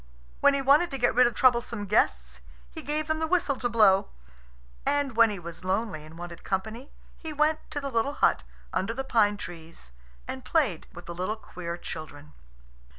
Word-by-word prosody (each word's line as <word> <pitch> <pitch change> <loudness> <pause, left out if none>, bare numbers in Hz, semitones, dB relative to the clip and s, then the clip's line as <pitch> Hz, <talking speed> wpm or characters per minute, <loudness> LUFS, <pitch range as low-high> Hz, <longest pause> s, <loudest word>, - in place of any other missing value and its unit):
When 285 0 +5
he 275 - -1
wanted 290 +6 +5
to 275 - -4
get 245 -2 +2
rid 250 0 +6
of 240 - -4
troublesome 235 -4 +2
guests, 60 - +1 0.3
he - - -7
gave 300 +3 -2
them 315 +1 -1
the 320 - 0
whistle 320 -6 +1
to 245 - -1
blow. 210 -4 +4 0.7
And 285 -4 0
when 230 -1 +6
he 205 - -4
was 170 0 -9
lonely 190 -4 -1
and 155 +2 -13
wanted 175 -1 -8
company, 220 +7 -3 0.3
he 320 - -6
went 305 +1 +2
to 295 - -3
the 275 -1 -5
little 235 +4 0
hut - - +2 0.3
under 220 +5 -1
the 270 - -2
pine 210 -5 +2
trees 165 - -10 0.4
and 260 -1 -6
played 265 - 0
with 175 - -11
the 170 - -6
little 185 +5 -2
queer 175 -5 -7
children. 150 -3 -8
225 Hz, 190 wpm, -27 LUFS, 175-275 Hz, 0.7 s, rid